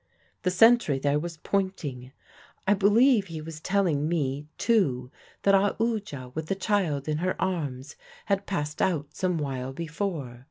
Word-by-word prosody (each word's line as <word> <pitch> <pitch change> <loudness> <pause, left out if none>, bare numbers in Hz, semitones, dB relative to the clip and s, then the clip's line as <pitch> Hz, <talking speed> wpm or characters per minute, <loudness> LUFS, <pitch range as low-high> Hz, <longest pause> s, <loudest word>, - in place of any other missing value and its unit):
"The 185 - +1
sentry 225 - +5
there 145 +2 +1
was 170 +1 -5
pointing. 155 -10 -2 0.5
I 200 - +4
believe 210 +2 +4
he 165 -2 -6
was 155 0 -8
telling 160 -5 +1
me, 145 -3 -1
too, 140 - +1 0.3
that 200 - +4
Aoodya, 200 - 0
with 155 0 -4
the 195 - 0
child 185 -8 0
in 155 0 0
her 185 +2 -1
arms, 150 -7 -3 0.3
had 200 -1 0
passed 150 -5 -2
out 150 -5 0
some 180 0 0
while 135 -3 -3
before. 155 -5 -4
165 Hz, 150 wpm, -27 LUFS, 145-195 Hz, 0.5 s, sentry